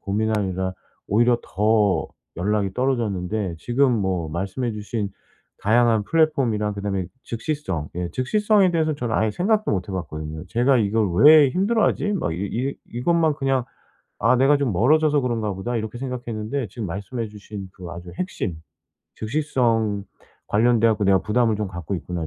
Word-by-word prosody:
고민하느라 100 -3 -1 0.4
오히려 120 +3 +3
더 105 -1 +2 0.3
연락이 100 +2 0
떨어졌는데 105 -7 -1
지금 130 +5 +2
뭐 95 -4 -1
말씀해 95 +8 -2
주신 105 -1 -4 0.5
다양한 115 0 +3
플랫폼이랑 130 -9 +1
그다음에 100 -2 -2 0.2
즉시성 115 - -3
예 90 -1 -2
즉시성에 205 - +3
대해서는 160 -3 0
저는 120 -4 -3
아예 110 0 +2
생각도 210 - +1
못 95 -1 -2
해 - - -5
봤거든요. 80 -2 -5
'쟤가 125 +5 +3
이걸 105 -2 +1
왜 150 -2 +8
힘들어하지? 205 - +1
막 175 - -1
이 80 - -4
이 130 +7 -2 0.2
이것만 160 +6 +2
그냥 135 -3 0 0.5
'아 115 +4 +3
내가 135 +3 +4
좀 135 -7 0
멀어져서 150 - +3
그런가 115 -4 -1
보다.' 115 +6 -3
이렇게 110 +1 -4
생각했는데 125 -1 -4
지금 105 +2 -6
말씀해 100 +6 -4
주신 105 -2 -9
그 90 -2 -10
아주 85 +1 -8
핵심 110 - -3 0.6
'즉시성 115 -5 0 0.4
관련돼 115 +1 +3
갖고 105 -2 0
내가 95 0 +5
부담을 110 0 +2
좀 105 0 -2
갖고 90 +1 -5
있구나 85 -1 -4
110 Hz, 355 characters per minute, -23 LUFS, 100-130 Hz, 0.6 s, 왜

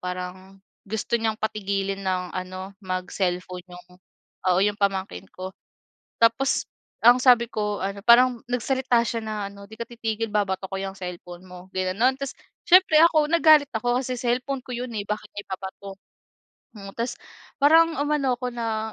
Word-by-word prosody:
parang 185 +1 -7 0.3
gusto 220 +3 -1
niyang 225 -1 0
patigilin 195 -2 -2
nang 185 -1 -2
ano, 185 +1 -6
mag-cellphone 185 -1 -3
'yong 180 0 -13 0.6
oo, 180 - +2
'yong 205 0 0
pamangkin 195 -1 -1
ko. 185 0 -7 0.7
Tapos 230 +4 +3 0.4
ang 240 +2 +8
sabi 245 -2 +6
ko 210 -1 -2
ano, 200 +1 -4
parang 245 0 +6
nagsalita 245 0 +1
siya 230 -1 -2
na 215 -1 -4 0.2
ano, 200 0 -13
"'Di 220 +2 -13
ka 235 - -3
titigil 225 -1 -3
babato 195 -2 0
ko 195 - -3
yang 195 0 -5
cellphone 180 0 -8
mo." 180 0 -12
ginano'n. 190 +8 +1
Tapos 275 -1 -3 0.4
siyempre 365 -4 +7
ako 310 -3 +2
nagalit 310 -4 +6
ako 245 +2 +1
kasi 255 -1 -3
cellphone 250 +3 -1
ko - - -12
'yon, 245 0 -5
eh, 205 - -2
bakit 210 0 -3
nya 205 - -4
ibabato. 190 +1 -7 0.8
Mm, 195 -1 -9
tapos 235 +1 -2 0.5
parang 325 +3 +5
umano 285 -3 +1
ako 250 0 -3
na 220 -2 -3
215 Hz, 160 wpm, -24 LUFS, 190-245 Hz, 0.8 s, ang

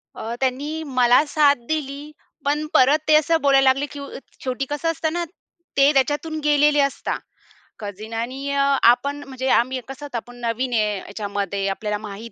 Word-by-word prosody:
अ, 230 +2 -5
त्यांनी 285 +5 -2 0.2
मला 245 +4 +6
साथ 285 -1 +4
दिली, 295 -1 -4 0.3
पण 300 +2 0
परत 280 +4 +5
ते 310 - +6
असं 320 +2 +3
बोलायला 275 -1 +4
लागले 275 +2 +1
की 285 - -8
उ 280 - -7
अ, - - -8 0.2
शेवटी 260 +1 -2
कसं 295 +3 -1
असतं 315 0 -2
ना, 345 0 -1 0.5
ते 275 +1 +6
त्याच्यातून 295 +4 0
गेलेले 295 0 +4
असतात 275 -1 0 0.6
कझीन. 210 +2 -7
आणि 260 +5 -3
अ, 280 0 +1 0.3
आपण 265 +4 +3
म्हणजे 260 -1 -5
आम्ही 255 +2 +2
कसं 270 +2 -8
आता 250 -4 -5
आपण 245 +2 -9
नवीन 240 +2 -2
आहे 210 -2 +1
ह्याच्यामध्ये, 200 -1 -3
आपल्याला 210 +2 -2
माहित 210 +2 -9
270 Hz, 175 wpm, -22 LUFS, 230-290 Hz, 0.6 s, मला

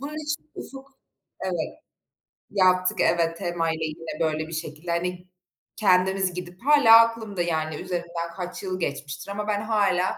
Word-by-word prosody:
Bunun 300 +2 -5
için 300 0 -4
ufuk, 270 0 -9 0.5
evet, - - -3 0.7
yaptık, 185 -2 +3
evet. 165 -1 +2
TEMA'yla 165 -2 -1
yine 155 0 -6
böyle 155 -1 0
bir 165 - -9
şekilde 155 +1 -5
hani 180 +1 -2 0.5
kendimiz 190 -2 +3
gidip 180 0 -8
hâlâ 285 -7 +8
aklımda 225 -5 -1
yani 160 -2 -1
üzerinden 170 -1 -4
kaç 180 +1 -6
yıl 185 -1 -3
geçmiştir 145 +4 -4
ama 210 +1 -4
ben 205 -1 0
hâlâ 200 -4 +1
180 Hz, 140 wpm, -25 LUFS, 165-205 Hz, 0.7 s, hâlâ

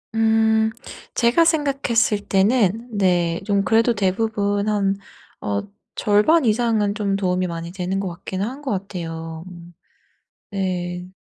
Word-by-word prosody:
음. 220 0 +3 0.4
제가 240 +8 +3
생각했을 275 -9 +2
때는 220 +2 +1
네 175 -3 +2
좀 200 -1 +1
그래도 225 +5 +3
대부분 205 0 0
한 200 -2 +1 0.5
어 100 -1 -1 0.3
절반 210 +11 +3
이상은 220 -3 +2
좀 200 -2 0
도움이 185 -2 0
많이 170 0 -5
되는 185 +1 -2
것 195 - -3
같긴 185 +2 -6
한 255 +8 -4
것 280 - -3
같아요. 165 -4 -5
음. 175 -1 -12 0.8
네. 180 -2 -3
200 Hz, 225 characters per minute, -22 LUFS, 180-225 Hz, 0.8 s, 음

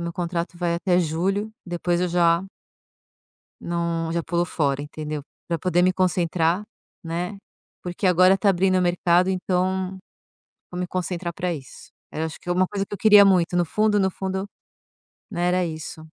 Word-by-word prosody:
meu 170 0 -4
contrato 175 0 -3
vai 170 -1 0
até 180 +1 +1
julho, 185 +6 0 0.2
depois 175 0 -1
eu 180 - +1
já 170 0 +3 1.2
Não, 170 -1 -2
já 170 0 -1
pulo 170 +1 0
fora, 145 -4 -1
entendeu, 150 0 -5 0.3
pra 170 -1 -1
poder 180 +1 +1
me 185 0 +4
concentrar, 180 0 +1 0.4
né, 175 +4 -4 0.4
porque 180 +2 -3
agora 185 +2 +5
tá 200 - +1
abrindo 185 0 +3
o 185 - +2
mercado, 175 +1 +2
então, 185 0 -1 0.8
vou 180 - -5
me 180 - -2
concentrar 175 -1 -3
pra 180 0 -2
isso. 135 -5 -11 0.2
Era 160 - -2
acho 160 - -7
que 175 - -9
é - - +3
uma 185 +1 +2
coisa 200 -1 -3
que - - -10
eu - - -4
queria 210 0 +7
muito 180 -3 +3
no 175 - +2
fundo, 210 +4 +2
no 190 0 +2
fundo, 190 +1 -3 0.9
né, 175 -2 0
era 180 0 +2
isso. 160 -1 -7
175 Hz, 175 wpm, -23 LUFS, 170-185 Hz, 1.2 s, queria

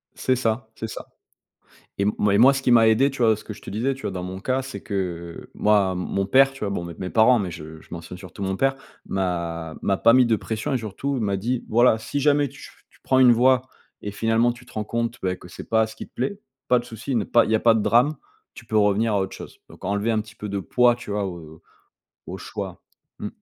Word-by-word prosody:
C'est 130 - +1
ça, 115 -1 -1
c'est 110 - -5
ça, - - -7 0.9
et 100 - +1
moi 100 -1 +2
moi 130 +5 +7
ce 135 - -2
qui 125 - +2
m'a 115 -2 +6
aidé, 130 +5 +4
tu 135 - -6
vois? 110 -2 +5
Ce - - -12
que 105 - -7
je - - -15
te - - -9
disais, 120 +7 -1
tu 135 - -12
vois? - - -2
Dans 90 -1 -5
mon 95 +1 -6
cas, 130 +6 -1
c'est 135 0 -8
que, 105 - -8 0.5
heu, - - -17
moi, 105 -3 +2
mon 95 +2 -2
père, 135 +6 +4
tu 135 - -13
vois? 105 - -1
Bon, 85 -3 -3
mes 85 - -7
mes 90 -1 -4
parents, 120 +2 +5
mais 95 -4 -3
je 80 0 -9
je - - -20
mentionne 85 +1 -8
surtout 95 +1 -9
mon 95 0 -1
père, 135 +6 +1 0.3
m'a 85 -4 -3
m'a 95 -1 +1
pas 115 - +5
mis 130 0 +6
de 115 -2 +3
pression 110 +6 -3
et - - +2
surtout 120 +5 -4
m'a 100 -3 0
dit: 120 +5 -2
«Voilà, 120 0 +4
si 145 +6 -4
jamais 145 0 +3
tu 140 - -14
ch - - -11 0.3
prends 130 - +3
une 125 -2 +7
voie 125 +2 +4 0.4
et 100 - -5
finalement, 115 +3 +2
tu 120 +1 -16
te 125 - -17
rends 105 -1 -3
compte, 115 +1 -2
beh, 90 -1 -1
que 90 - -14
c'est - - -10
pas 110 -1 +3
ce - - -11
qui - - -8
te - - -37
plaît, 135 +11 -3 0.3
pas 125 - +5
de 120 - -9
souci, 125 +3 -5
ne 110 - +1
pas 120 - +4
il - - -3
y - - +4
a 110 - +2
pas 115 -1 +5
de 110 - +1
drame. 125 +8 +3 0.4
Tu 120 - -13
peux 110 -1 0
revenir 105 +2 +2
à 100 - +2
autre 95 0 -3
chose, - - -11
donc - - -16
enlever 100 +4 0
un 110 - +1
petit 110 0 -14
peu 105 - -6
de 100 0 -2
poids», 120 +5 +3
tu 120 -4 -9
vois? 105 -1 -1
Au 90 -2 -5
au 80 - -16 0.6
au - - -6
choix. - - -7 0.4
Mmh. - - -4
110 Hz, 270 wpm, -23 LUFS, 100-125 Hz, 0.9 s, moi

